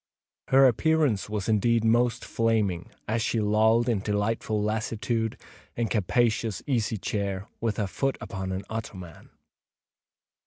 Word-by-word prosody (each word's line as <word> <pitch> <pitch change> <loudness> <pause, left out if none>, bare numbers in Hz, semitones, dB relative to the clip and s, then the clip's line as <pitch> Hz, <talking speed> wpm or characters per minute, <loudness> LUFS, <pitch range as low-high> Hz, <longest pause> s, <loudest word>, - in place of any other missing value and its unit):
Her 135 +1 +6
appearance 135 -4 +2
was 105 -2 -3
indeed 115 +1 +2
most 120 +1 +2
flaming, 110 -6 0 0.2
as 110 +1 0
she 115 - 0
lolled, 110 +3 +3
in 115 -4 +1
delightful 105 +1 -1
lassitude, 110 +1 -1 0.4
in 120 - 0
a - - -4
capacious 110 0 +1
easy 115 -5 0
chair, 100 0 -3
with 115 -2 -1
her 105 - 0
foot 135 +8 -1
upon 95 -5 -5
an 95 +1 -3
ottoman. 95 -7 -7
110 Hz, 130 wpm, -27 LUFS, 105-115 Hz, 0.4 s, Her